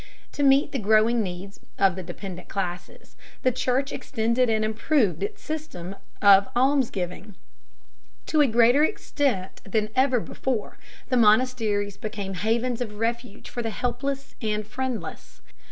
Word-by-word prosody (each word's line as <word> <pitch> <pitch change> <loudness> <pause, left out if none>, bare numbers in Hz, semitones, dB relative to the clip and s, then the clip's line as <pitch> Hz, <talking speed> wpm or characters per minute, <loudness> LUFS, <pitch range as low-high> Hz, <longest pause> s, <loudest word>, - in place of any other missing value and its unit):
To - - -4
meet 275 0 +4
the 275 - -2
growing 220 +2 +3
needs 190 0 -6 0.2
of 195 -2 +3
the 190 - -5
dependent 180 0 -8
classes, 180 -2 -5 0.3
the 255 - +4
Church 255 +2 0
extended 235 +2 0
and 220 -1 +1
improved 220 - +1
its 420 +1 -4
system 200 - -6 0.3
of 200 -1 +7
almsgiving. 220 -7 0 0.9
To 310 - +2
a 290 - +5
greater 240 +5 +5
extent 275 - -1
than 215 +1 -1
ever 260 -1 +3
before 235 0 -4 0.3
the 255 - +2
monasteries 215 -3 +2
became 205 -3 -5
havens 230 +5 -1
of 210 -4 -4
refuge 230 -1 -3
for 240 - -4
the 225 - -2
helpless 260 +4 -3
and 215 -1 -1
friendless. 255 +2 -5
225 Hz, 135 wpm, -25 LUFS, 205-255 Hz, 0.9 s, of